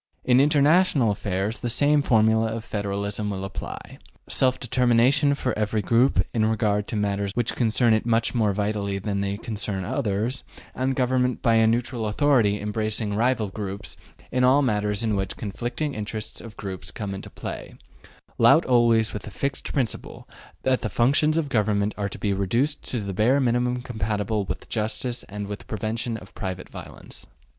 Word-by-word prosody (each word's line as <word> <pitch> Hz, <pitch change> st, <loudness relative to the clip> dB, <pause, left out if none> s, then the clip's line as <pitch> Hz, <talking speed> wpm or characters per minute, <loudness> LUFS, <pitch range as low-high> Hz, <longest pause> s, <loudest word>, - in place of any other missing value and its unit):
In 125 Hz, 0 st, +5 dB
international 150 Hz, -, +4 dB
affairs 100 Hz, +1 st, -2 dB
the 120 Hz, -, -3 dB
same 145 Hz, +5 st, +3 dB
formula 110 Hz, -3 st, +3 dB
of 115 Hz, 0 st, -4 dB
federalism 100 Hz, 0 st, -2 dB
will 95 Hz, -1 st, -3 dB
apply: 95 Hz, -, -8 dB, 0.3 s
self 130 Hz, -1 st, +1 dB
determination 125 Hz, +4 st, +3 dB
for 130 Hz, -2 st, -2 dB
every 105 Hz, 0 st, -1 dB
group 115 Hz, -4 st, +3 dB
in 110 Hz, -, +1 dB
regard 105 Hz, -2 st, +1 dB
to -, -, -4 dB
matters 100 Hz, -1 st, -1 dB
which 120 Hz, -2 st, -1 dB
concern 115 Hz, 0 st, +3 dB
it 110 Hz, -, +2 dB
much 115 Hz, -1 st, +1 dB
more 110 Hz, -4 st, +2 dB
vitally 100 Hz, 0 st, -1 dB
than 100 Hz, 0 st, -2 dB
they 100 Hz, 0 st, -2 dB
concern 105 Hz, -4 st, -4 dB
others, 115 Hz, +2 st, -1 dB, 0.3 s
and 130 Hz, +1 st, -1 dB
government 125 Hz, -1 st, +1 dB
by 115 Hz, -, +4 dB
a 115 Hz, 0 st, +5 dB
neutral 120 Hz, 0 st, 0 dB
authority 105 Hz, -3 st, +2 dB
embracing 105 Hz, 0 st, -2 dB
rival 115 Hz, -1 st, +1 dB
groups 100 Hz, +1 st, -6 dB, 0.4 s
in 125 Hz, 0 st, +1 dB
all 135 Hz, +3 st, +5 dB
matters 105 Hz, -3 st, 0 dB
in 110 Hz, -2 st, +1 dB
which 95 Hz, -1 st, -3 dB
conflicting 120 Hz, +8 st, -3 dB
interests 105 Hz, 0 st, -5 dB
of 115 Hz, -2 st, -11 dB
groups 95 Hz, -2 st, -6 dB
come 100 Hz, -3 st, -5 dB
into 95 Hz, -, -7 dB
play; -, -, -7 dB, 0.6 s
lout -, -, +6 dB
always 115 Hz, -3 st, +3 dB
with 105 Hz, -, -4 dB
the -, -, -9 dB
fixed 135 Hz, +6 st, -3 dB
principle 125 Hz, -6 st, -3 dB, 0.4 s
that 130 Hz, -1 st, +2 dB
the 110 Hz, -, -2 dB
functions 145 Hz, +7 st, +3 dB
of 160 Hz, -3 st, 0 dB
government 105 Hz, -4 st, +1 dB
are 100 Hz, -1 st, -2 dB
to -, -, -7 dB
be 100 Hz, -2 st, 0 dB
reduced 115 Hz, +10 st, 0 dB
to 120 Hz, -, -4 dB
the 100 Hz, -1 st, -4 dB
bare 120 Hz, +8 st, +3 dB
minimum 125 Hz, -1 st, +1 dB
compatible 105 Hz, -3 st, -2 dB
with -, -, -6 dB
justice 115 Hz, +2 st, -2 dB
and 105 Hz, 0 st, -5 dB
the 105 Hz, 0 st, -4 dB
prevention 110 Hz, +2 st, -3 dB
of 95 Hz, -1 st, -13 dB
private 95 Hz, -2 st, -5 dB
violence. -, -, -10 dB
110 Hz, 170 wpm, -24 LUFS, 105-125 Hz, 0.6 s, lout